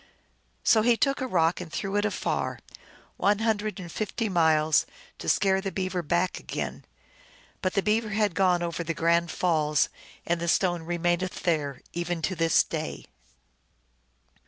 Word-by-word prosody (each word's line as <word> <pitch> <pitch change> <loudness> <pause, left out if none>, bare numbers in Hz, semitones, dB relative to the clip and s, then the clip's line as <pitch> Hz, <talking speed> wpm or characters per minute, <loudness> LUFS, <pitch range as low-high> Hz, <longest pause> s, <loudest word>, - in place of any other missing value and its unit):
So 220 - +5
he 235 +1 +3
took 275 +1 +1
a 260 - -1
rock 170 -5 +2
and 175 -3 -8
threw 195 +3 -3
it 205 0 +2
afar, 210 - -1 0.2
2 - - -15 0.4
one 205 +1 +3
hundred 215 -1 -1
and 175 -2 -8
fifty 215 +3 -2
miles, 160 -3 +3 0.3
to - - -3
scare 190 -1 +3
the 195 0 -3
Beaver 185 -1 -2
back 175 +3 0
again; - - -5 0.8
but 185 - -1
the 195 - +2
Beaver 215 +1 +1
had 210 -2 +1
gone 180 -2 +2
over 170 0 -3
the 165 0 -3
Grand 170 +1 +2
Falls 155 -3 +1 0.4
and 170 0 0
the 170 - -2
stone 175 0 +2
remaineth 175 +2 -1
there 150 -6 0
even 175 -1 -3
to 185 +4 0
this 165 -1 +4
day. - - -5
175 Hz, 160 wpm, -27 LUFS, 165-205 Hz, 0.8 s, So